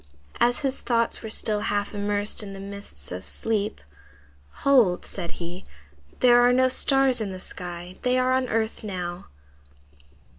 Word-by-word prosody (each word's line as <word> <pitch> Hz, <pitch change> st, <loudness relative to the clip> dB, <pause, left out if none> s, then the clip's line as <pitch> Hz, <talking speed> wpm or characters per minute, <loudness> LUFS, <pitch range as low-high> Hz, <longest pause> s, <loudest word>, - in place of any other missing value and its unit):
As 245 Hz, +4 st, +3 dB
his 270 Hz, -2 st, -1 dB
thoughts 235 Hz, -1 st, 0 dB
were 220 Hz, -, -6 dB
still 215 Hz, -1 st, +1 dB
half 205 Hz, 0 st, -1 dB
immersed 205 Hz, +1 st, 0 dB
in 200 Hz, -2 st, -7 dB
the 195 Hz, -, -8 dB
mists 195 Hz, -, -6 dB
of 90 Hz, +1 st, -5 dB
sleep, 210 Hz, -, -2 dB, 0.8 s
"Hold!" 245 Hz, -11 st, +4 dB
said 170 Hz, -, -5 dB
he, 175 Hz, +1 st, -7 dB, 0.6 s
"there 245 Hz, -1 st, +7 dB
are 245 Hz, 0 st, +5 dB
no 255 Hz, +1 st, +4 dB
stars 270 Hz, -1 st, +3 dB
in 205 Hz, -3 st, -3 dB
the 185 Hz, -, -7 dB
sky. 180 Hz, 0 st, -7 dB
They 250 Hz, 0 st, +2 dB
are 255 Hz, 0 st, +2 dB
on 260 Hz, -1 st, +1 dB
earth 220 Hz, 0 st, -1 dB
now." 180 Hz, -3 st, -5 dB
210 Hz, 155 wpm, -25 LUFS, 185-245 Hz, 0.8 s, there